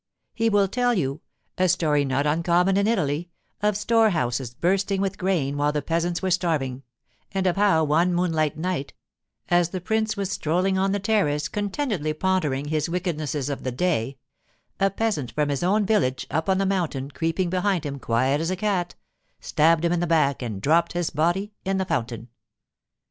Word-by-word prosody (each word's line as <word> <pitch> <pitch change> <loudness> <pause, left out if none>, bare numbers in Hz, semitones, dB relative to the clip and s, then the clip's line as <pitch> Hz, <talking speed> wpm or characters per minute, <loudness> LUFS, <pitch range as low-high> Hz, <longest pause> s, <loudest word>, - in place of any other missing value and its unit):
He 225 0 +1
will 205 -2 +3
tell 245 +4 +1
you—a 165 +3 -3
story 155 -5 +2
not 135 +2 0
uncommon 170 +5 +2
in 200 +1 +2
Italy—of 175 +2 -2
storehouses 170 - +1
bursting 195 +5 +1
with 195 0 -2
grain 165 -7 0
while 145 +1 +2
the 150 -1 -2
peasants 170 +3 -1
were 190 - 0
starving, 155 -8 0 0.5
and 190 -1 -1
of 180 - +2
how, 195 -5 +3
one 160 +4 +2
moonlight 160 -4 0
night, 170 -4 -3 0.5
as 175 -1 +3
the 185 - -4
prince 220 +3 -1
was 195 -1 -2
strolling 180 +5 0
on 190 +1 +1
the 200 - +1
terrace 190 -8 +1
contentedly 205 - -2
pondering 150 -6 0
his 155 0 -1
wickednesses 155 -6 -2
of 140 -2 -3
the 130 - -3
day, 135 -3 -1 0.6
a 195 - +3
peasant 195 - -2
from 150 -1 0
his 140 -2 -1
own 200 +4 +2
village 160 -12 +1
up 160 +4 -1
on 190 - +3
the 195 - +1
mountain, 165 -8 -1
creeping 165 +3 -1
behind 185 -3 0
him, 140 -1 -4
quiet 130 +5 +1
as 165 - -1
a 185 - 0
cat, 185 -3 -1 0.4
stabbed 165 +2 +2
him 170 - +2
in 175 - 0
the 175 - 0
back 150 -5 +2
and 110 -5 -5
dropped 165 +3 +3
his 175 -1 -1
body 175 +7 0
in 195 0 0
the 190 - 0
fountain. 115 - -3
170 Hz, 175 wpm, -24 LUFS, 150-195 Hz, 0.6 s, will